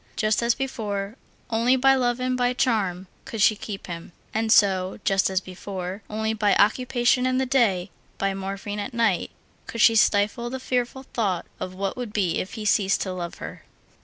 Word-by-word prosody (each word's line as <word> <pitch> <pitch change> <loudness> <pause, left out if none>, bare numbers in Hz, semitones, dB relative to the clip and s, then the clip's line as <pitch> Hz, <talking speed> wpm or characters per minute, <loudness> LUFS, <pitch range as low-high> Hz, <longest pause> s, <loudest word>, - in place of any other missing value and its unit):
Just 215 0 +1
as 235 0 +2
before, 210 -6 -3 0.4
only 230 +3 +3
by 270 +1 +5
love 245 -2 +1
and 255 0 0
by 250 0 +1
charm 200 -8 0 0.2
could 225 - -6
she 215 +1 +5
keep 205 -1 -7
him. 170 -1 -8 0.2
And 220 0 0
so, 190 -3 +3
just 195 -1 +2
as 190 -1 +1
before, 185 +1 -6
only 220 +1 -1
by 210 -2 +2
occupation 245 +3 +3
in 255 0 +1
the 265 - +1
day, 230 -9 +2 0.3
by 195 0 0
morphine 195 +2 -5
at 220 +4 -5
night, 225 -6 +1 0.4
could 230 - -6
she 225 +1 +6
stifle 215 +3 +2
the 260 +1 -4
fearful 250 +1 -2
thought 195 -7 0
of 185 0 -5
what 195 0 -2
would 240 -4 -5
be 190 -5 +1
if 185 - -5
he 220 -2 -6
ceased 200 -1 +2
to 185 - -2
love 175 -2 -5
her. - - -8
215 Hz, 190 wpm, -24 LUFS, 195-240 Hz, 0.4 s, she